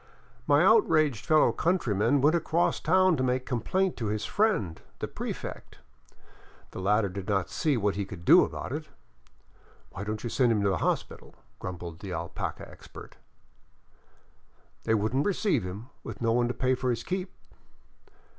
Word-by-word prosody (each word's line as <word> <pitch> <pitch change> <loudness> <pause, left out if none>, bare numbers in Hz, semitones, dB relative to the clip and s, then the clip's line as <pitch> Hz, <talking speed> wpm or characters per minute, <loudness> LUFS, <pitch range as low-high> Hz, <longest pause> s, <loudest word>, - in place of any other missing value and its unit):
My 145 +4 +5
outraged 155 - +3
fellow 155 -1 +5
countryman 140 - +1
went 150 +5 +4
across 170 +1 +1
town 185 +1 +3
to 130 - 0
make 130 0 0
complaint 185 - 0
to 115 - -3
his 105 0 -2
friend, 115 - 0 0.2
the - - -4
prefect. - - -7 0.9
The - - -7
latter 105 +2 +2
did 95 0 -7
not 95 -4 0
see 150 -5 +1
what 105 -2 +1
he 100 - -1
could 90 -3 -10
do - - +8
about - - -5
it. - - -4 0.5
" - - -31
Why 95 - -6
don't 105 +1 -4
you 120 - -3
send 125 -3 +3
him 105 -3 +1
to 100 - +3
the 95 - 0
hospital? - - -3
" - - -37
grumbled 85 -2 -7
the 95 -3 -6
alpaca 85 +1 -5
expert. - - -13 1.7
"They 110 - +3
wouldn't 110 - 0
receive 205 0 +1
him, 100 +7 -7
with - - -8
no 115 -1 +1
one 120 +1 +2
to 120 - -2
pay 130 0 +1
for 130 0 -1
his 120 -1 -1
keep." 185 0 -3
120 Hz, 170 wpm, -28 LUFS, 100-155 Hz, 1.7 s, do